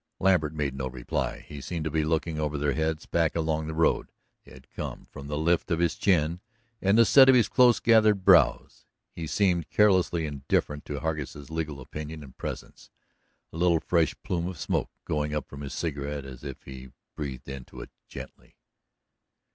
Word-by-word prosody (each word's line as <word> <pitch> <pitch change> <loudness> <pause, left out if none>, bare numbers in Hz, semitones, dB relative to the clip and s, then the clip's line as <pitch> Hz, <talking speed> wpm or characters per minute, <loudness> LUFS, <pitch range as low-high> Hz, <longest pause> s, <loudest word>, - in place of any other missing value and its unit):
Lambert 85 -5 +2
made 75 -3 -1
no 65 0 -3
reply. 65 -1 -3
He 70 - -8
seemed 85 +2 -4
to 80 - -2
be 80 0 +1
looking 80 0 -1
over 75 -1 -1
their 70 0 0
heads, 80 0 -1
back 80 -2 0
along 80 -1 -1
the 80 - -5
road 80 +1 +1 0.3
they - - -18
had 65 0 -15
come, - - -6
from 70 - -9
the 75 0 -3
lift 85 +4 +1
of 85 - +1
his 85 0 +1
chin 85 -3 +1 0.4
and 100 +3 +3
the 115 - +7
set 130 +5 +7
of 130 - +7
his 115 -5 +4
close 125 -2 +5
gathered 110 -4 +4
brows. 90 -4 +4 0.2
He 80 -2 -6
seemed 90 -3 +1
carelessly 95 -5 +3
indifferent 75 0 -2
to 70 -1 -5
Hargus' 75 -2 -4
legal 80 -3 -3
opinion 75 +4 -7
and 65 -3 -14
presence, - - -7 0.6
a - - -7
little 85 -1 +3
fresh 85 -1 +1
plume 85 -1 -2
of 90 -2 -6
smoke - - -1 0.2
going 75 0 -1
up 75 - -3
from 70 - -10
his 70 -2 -6
cigarette 70 -3 -3
as 65 -1 -10
if 70 -3 -8
he 65 -1 -10 0.3
breathed 70 -3 -6
into 65 -2 -9
it - - -10 0.2
gently. - - -11
80 Hz, 185 wpm, -27 LUFS, 70-85 Hz, 0.6 s, the